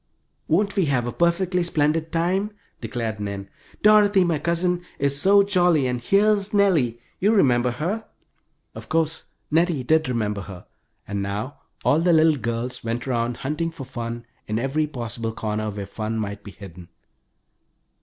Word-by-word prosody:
"Won't 200 +5 +1
we 190 - +3
have 130 -5 +1
a 120 - -2
perfectly 175 +3 +1
splendid 160 -1 0
time?" 185 +5 0 0.3
declared 115 -2 -4
Nan. 100 -1 -5 0.3
"Dorothy, 210 -2 +6
my 165 -4 0
cousin, 175 +2 0
is 140 0 0
so 200 +1 +6
jolly, 180 -7 +3
and 125 -1 -1
here's 205 - +2
Nellie 160 - +3 0.2
you 205 +3 +3
remember 125 - +3
her?" 175 - -3 0.7
Of - - -10
course 160 0 0 0.3
Nettie 165 -3 +2
did 155 +2 +2
remember 105 -4 -1
her, 95 -2 -10 0.4
and 100 0 -3
now 105 +7 -4 0.3
all 150 - +4
the 170 +1 +3
little 160 -1 +5
girls 120 +2 -3
went 115 +2 -3
around 120 -1 -1
hunting 155 +4 -1
for 165 -4 -9
fun 115 -1 -6 0.2
in 110 - -1
every 135 +6 0
possible 115 -5 -4
corner 110 -1 -2
where 100 -1 -5
fun 110 +2 -4
might 100 -1 -4
be - - -9
hidden. 90 -3 -12
140 Hz, 155 wpm, -23 LUFS, 115-175 Hz, 0.7 s, Dorothy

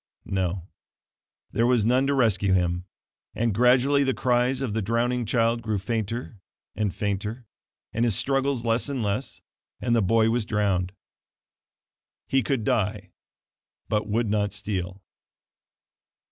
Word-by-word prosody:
No; 95 -2 -2 0.8
there 115 +1 +2
was 120 -4 +3
none 130 +3 +3
to 140 - +2
rescue 105 -6 +3
him; 90 -1 +1 0.5
and 115 -1 +1
gradually 125 +5 +4
the 130 -1 0
cries 125 +1 +1
of 130 -6 -2
the 110 - 0
drowning 120 +3 0
child 115 +1 +2
grew 110 -2 -1
fainter 110 +2 -3 0.4
and 105 0 0
fainter, 105 +5 -3 0.5
and 115 - +1
his 115 -5 +2
struggles 135 -2 0
less 115 +4 +1
and 135 -4 -2
less, 105 +6 -3 0.4
and 120 -1 +1
the 115 - +3
boy 110 +3 +3
was 120 0 +1
drowned. 100 -4 0 1.3
He 135 - +2
could 135 -4 -1
die, 105 -3 -1 0.8
but 105 -1 0
would 115 +2 +1
not 105 -1 0
steal. 95 -2 -4
115 Hz, 135 wpm, -25 LUFS, 100-125 Hz, 1.3 s, gradually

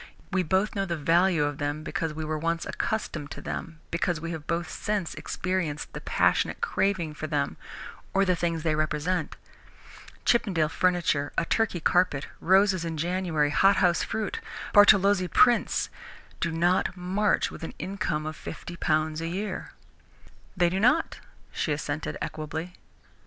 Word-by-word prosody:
"We 190 -1 +2
know 190 +3 +2 0.2
the 170 -1 -2
value 170 +1 +3
of 145 -1 -2
them 145 +1 -2
because 160 0 -2
we 155 +1 -5
were 155 0 -2
once 165 +1 -1
accustomed 155 -9 -3
to - - -7
them, 160 -1 -6
because 170 -1 0
we 165 +2 -5
have 160 -2 -6
both 170 0 -1
since 205 0 -2
experienced 175 -5 -3
the - - -6
passionate - - +1
craving 180 -6 0
for 155 +1 -5
them 145 -2 -1 0.6
or 195 0 +3
the 185 -1 +2
things 165 -2 -1
they 160 -2 +1
represent. 155 +2 -1 0.9
Chippendale 180 -10 +2
furniture, 170 -5 +1
a 170 - +2
Turkey 215 -2 +1
carpet, 170 -4 +2
roses 190 0 +4
in 165 -1 -3
January, 165 -3 0
hothouse 190 -1 +4
fruit, 220 -2 -3 0.3
Bartolozzi 200 -2 +6
prints, 240 +5 +3 0.5
do 170 - 0
not 175 +2 +1
march 190 +4 +1
with - - -10
an 165 - -6
income 175 -5 -2
of 155 0 -4
fifty 175 +3 -8
pounds 155 -1 0
a 165 - -2
year." 190 +3 -4 0.9
"They 175 -1 +4
do 190 - 0
not," 250 +10 +2 0.3
she 155 - -2
assented 145 +1 -3
equably. 160 +3 -5
170 Hz, 150 wpm, -27 LUFS, 155-185 Hz, 0.9 s, Bartolozzi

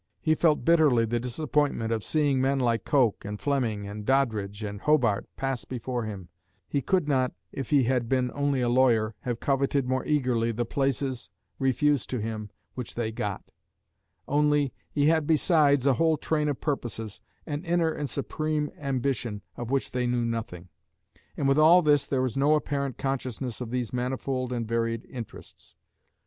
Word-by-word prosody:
He 155 - +2
felt 155 -1 +2
bitterly 150 -9 +4
the 120 +1 -1
disappointment 125 -1 -1
of 110 -2 -1
seeing 145 -4 +1
men 135 +1 +2
like 115 -4 +1
Coke 125 -8 +2
and 105 0 -5
Fleming 115 -8 -1
and 105 +1 -6
Doddridge 110 -5 0
and 105 -1 -5
Hobart 125 -10 +2
pass 135 -2 -2
before 125 -1 -4
him; 95 -5 -7 0.4
he 140 - -1
could 180 +2 +1
not, 130 -3 +1 0.2
if 135 -3 -5
he 140 -3 +4
had 120 -1 0
been 130 -2 +1
only 140 -2 0
a 120 - +1
lawyer, 120 -3 +3
have 120 -2 -3
coveted 140 -1 +1
more 130 0 0
eagerly 125 -6 +1
the 120 +2 -2
places, 135 0 -1 0.3
refused 135 +1 +1
to 125 - -2
him, 110 -1 -4 0.2
which 125 -2 -7
they 115 -2 -2
got; 105 -3 -4 0.8
only, 150 -1 +2 0.2
he 145 -1 +1
had 160 -1 +3
besides 150 -4 +3
a 140 - +5
whole 160 +4 +2
train 150 0 0
of 140 - -2
purposes, 115 -7 -3 0.2
an 150 +1 -4
inner 170 -2 +1
and 145 -3 -4
supreme 150 +1 -2
ambition, 130 -6 -2
of 120 -1 -6
which 135 0 0
they 125 -1 0
knew 120 -1 0
nothing. 110 -7 -4 0.7
And 140 - +1
with 135 +2 +3
all 170 +4 +7
this 145 -2 +3
there 130 -2 +1
is 125 - -3
no 145 +3 +4
apparent 140 -4 -2
consciousness 130 -2 -3
of 120 - -4
these 125 -1 -3
manifold 130 0 -2
and 120 -2 -2
varied 115 0 -1
interests. 120 -4 -10
130 Hz, 170 wpm, -27 LUFS, 115-145 Hz, 0.8 s, all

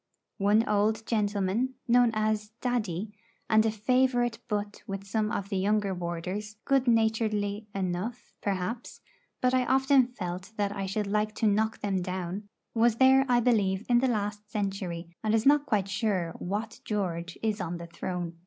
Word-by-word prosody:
One 210 +3 +3
old 215 +2 +1
gentleman, 210 +3 0
known 245 0 +5
as 215 0 0
'Daddy,' 215 -5 -2 0.3
and 220 -1 +5
a - - +3
favourite 240 +1 +1
butt 205 -1 -3
with 195 0 -5
some 215 +1 -1
of 200 0 -3
the 195 - -1
younger 205 0 +1
warders 180 +4 -4
good 270 -2 +2
naturedly 220 -2 +1
enough, 190 +5 -3
perhaps; 200 +4 -3 0.4
but 255 0 +3
I 255 -1 +3
often 265 -1 +4
felt 185 -3 -6
that 205 -1 0
I 195 -1 -3
should 210 +2 -1
like 210 +1 0
to - - -1
knock 215 +2 +1
them 195 -2 0
down 185 +3 -4 0.2
was 230 0 +3
there, 265 +2 +5
I 240 -1 +4
believe, 210 -4 +2
in 240 -1 +4
the 260 - +2
last 210 -2 -2
century, 185 -5 -3
and 215 0 +2
is 220 - +1
not 290 +1 +5
quite 200 -4 +1
sure 190 -5 -1
what 215 +4 -4
George 175 -5 -3
is 215 -2 0
on 175 0 -3
the 170 - -7
throne. 170 0 -5
210 Hz, 165 wpm, -28 LUFS, 190-230 Hz, 0.4 s, known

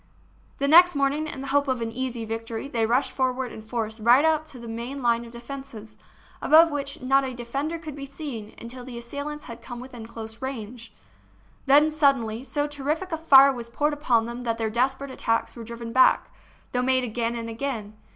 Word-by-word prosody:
The 280 - 0
next 350 +3 +7
morning, 280 +2 +1
in 275 - -6
the 275 - -6
hope 285 0 +3
of 260 -2 0
an 230 -1 -3
easy 245 -1 -3
victory, 225 +2 -5
they 230 -5 0
rushed 250 +4 +1
forward 260 -1 -1
in 220 - -9
force 220 0 -3
right 240 +7 +5
up 315 -1 +2
to 275 - -10
the 235 -1 -9
main 240 +4 -5
line 235 0 +2
of 230 - -12
defences, 235 -3 -9 0.5
above 325 +2 +6
which 280 -2 -4
not 270 +2 +3
a 260 -2 -4
de 240 0 -7
fender 285 +7 -2
could 310 -3 -8
be 275 -1 -7
seen 270 -7 -7
until 245 +2 -8
the 245 -1 -8
assailants 285 +5 -6
had 230 - -9
come 240 -2 -8
within 245 -3 -9
close 225 -1 -8
range. 235 -3 -6 0.8
Then, 295 +3 +6
suddenly, 265 -7 +1
so 290 +2 -1
terrific 295 +5 -3
a 325 - -1
fire 275 -3 +7
was 235 -2 -6
poured 295 +5 0
upon 245 -6 +2
them 235 +1 -6
that 230 -2 -1
their 220 -1 -1
desperate 265 +4 0
attacks 230 -3 -1
were 235 - -8
driven 230 0 -7
back, 260 0 +4 0.4
though 250 - 0
made 260 0 +2
again 235 0 -2
and 230 -1 -4
again. 225 -3 -4
255 Hz, 205 wpm, -25 LUFS, 230-280 Hz, 0.8 s, next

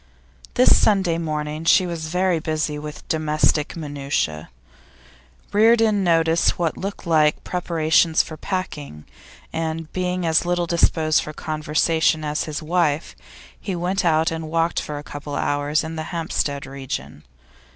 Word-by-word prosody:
This 250 - +6
Sunday 190 -6 +2
morning 155 -1 -3
she 185 +3 +5
was 165 -2 -4
very 180 0 +1
busy 155 -2 -2
with 150 0 -9
domestic 155 -1 +1
minutiae. 140 - -3 1.0
Reardon 220 -1 +4
noticed 165 -1 +2
what 170 -3 0
looked 200 +1 -6
like 155 -2 +3
preparations 165 -2 +2
for 160 - -8
packing, 150 - -5 0.5
and 160 0 -3
being 180 -1 -1
as 160 -1 +3
little 175 0 0
disposed 160 -2 +2
for 155 - -7
conversation 155 +1 0
as 150 0 -1
his 155 +1 -5
wife, 160 -2 0 0.4
he 195 - -4
went 180 +3 -1
out 160 -1 +2
and 160 -1 -5
walked 165 +1 0
for 150 - -5
a 145 - -7
couple 145 0 -7
of - - -1
hours 145 +2 0
in 160 +1 -6
the 155 - -4
Hampstead 155 -4 -2
region. 135 -1 -6
160 Hz, 140 wpm, -22 LUFS, 150-175 Hz, 1.0 s, This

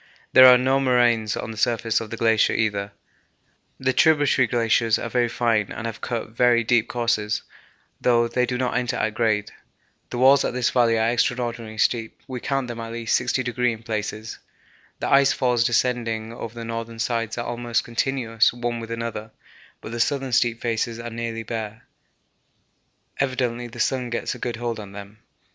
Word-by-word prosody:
There 130 0 +10
are 125 -1 +9
no 130 +2 +2
moraines 120 -5 +2
on - - -5
the 110 - -9
surface 115 0 +1
of 110 - -7
the 115 - -6
glacier 110 -1 +3
either. 105 -2 -1 0.9
The 130 0 +1
tributary 145 -5 +4
glaciers 115 -1 +2
are 115 - -5
very 120 -1 +1
fine 115 -4 0
and 110 - -6
have 115 -1 -5
cut 115 -2 -4
very 120 0 +3
deep 115 0 +2
courses, 115 -3 -1 0.6
though 120 -1 +3
they 125 +1 0
do 125 0 -2
not 125 0 -1
enter 125 -1 0
at 110 - -1
grade. 110 -3 0 0.6
The - - -5
walls 135 +2 +5
of - - -2
this 125 -1 +1
valley 115 -2 +3
are 110 +1 +2
extraordinarily 120 -2 -2
steep; 110 +1 0
we 130 -1 -5
count 135 0 -2
them 120 -1 -6
at 115 0 -6
least 115 0 0
60° 125 -1 0
in 115 0 -8
places. 110 0 -4 0.6
The - - -3
ice 140 0 +5
falls 125 -3 +1
descending 115 -2 0
over 115 -1 -7
the 115 -1 -6
northern 115 0 -5
sides 115 -1 -2
are 120 - -3
almost 120 -1 -1
continuous 115 -2 +1
one 120 0 -3
with 115 0 -8
another, 115 -1 -5 0.5
but - - -8
the 120 - -5
southern 135 +1 0
steep 120 -1 +1
faces 115 0 -1
are 120 0 -6
nearly 115 0 -4
bare; 110 0 -6 1.4
evidently 125 -3 -1
the 120 0 -11
sun 125 +1 0
gets 120 - -2
a - - -10
good 120 -2 -3
hold 120 -1 -4
on 100 -2 -9
them. 100 +2 -10
115 Hz, 180 wpm, -23 LUFS, 115-125 Hz, 1.4 s, There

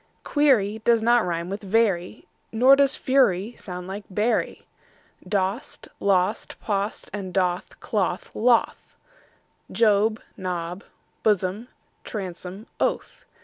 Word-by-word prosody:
Query 235 -8 +2
does 230 -1 +3
not 235 0 +4
rime 170 0 -2
with 200 +2 -5
very, 200 -2 0 0.2
Nor 255 +4 +6
does 275 -1 +3
fury 235 -5 +2
sound 180 -1 -7
like 200 +2 -6
bury. 210 +5 -1 0.6
Dost, 195 -1 -2
lost, 195 +2 0
post 205 -1 -3
and 195 -3 -5
doth, 180 -1 -1
cloth, 190 -4 -2
loth; 235 +1 +1 0.8
Job, 215 0 +3 0.2
Job, 180 0 -4 0.4
blossom, 205 +2 0 0.4
bosom, 185 0 -6
oath. - - -2
205 Hz, 105 wpm, -24 LUFS, 185-225 Hz, 0.8 s, Nor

